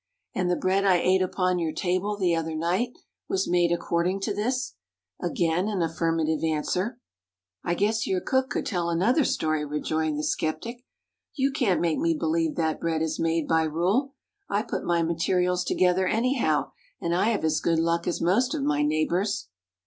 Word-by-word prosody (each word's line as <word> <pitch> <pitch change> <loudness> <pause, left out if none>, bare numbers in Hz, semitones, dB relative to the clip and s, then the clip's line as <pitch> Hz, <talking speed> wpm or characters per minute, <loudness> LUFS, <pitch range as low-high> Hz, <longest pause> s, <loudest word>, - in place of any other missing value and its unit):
"And 180 -1 0
the 180 - +2
bread 190 +2 +1
I 190 -2 +5
ate 185 +2 +3
upon 185 -1 0
your 165 -2 -1
table, 185 +4 -1
the 180 -4 +2
other 160 -1 -2
night, 180 +10 -1 0.3
was 190 0 0
made 175 -1 +2
according 175 +2 0
to 205 +1 -1
this?" 250 +6 -2 0.5
Again 175 +1 0
an 200 -5 0
affirmative 165 -1 0
answer. 180 +8 -1 0.7
"I 175 - 0
guess 215 +4 0
your 185 - +1
cook 260 +6 0
could 245 - -2
tell 175 -4 -1
another 205 - +2
story," 155 -9 0
rejoined 150 +1 -1
the 150 - -2
skeptic. 235 +13 -2 0.5
"You 275 -1 +1
can't 245 -10 +1
make 165 -2 +1
me 165 -1 +1
believe 160 0 0
that 160 -2 0
bread 160 -1 0
is 160 - -2
made 165 -1 0
by 160 0 +3
rule. 195 - 0 0.3
I 205 +2 +1
put - - -4
my 170 -1 +1
materials 180 +2 +1
together 185 +1 +2
anyhow, 225 - +1 0.3
and 170 - -1
I 180 +3 +2
have 220 -5 0
as 155 -1 +2
good 165 -1 +1
luck 170 +1 0
as 175 - -1
most 200 +9 +2
of 135 - -2
my 145 +1 +1
neighbors." 155 - 0
175 Hz, 180 wpm, -26 LUFS, 160-195 Hz, 0.7 s, I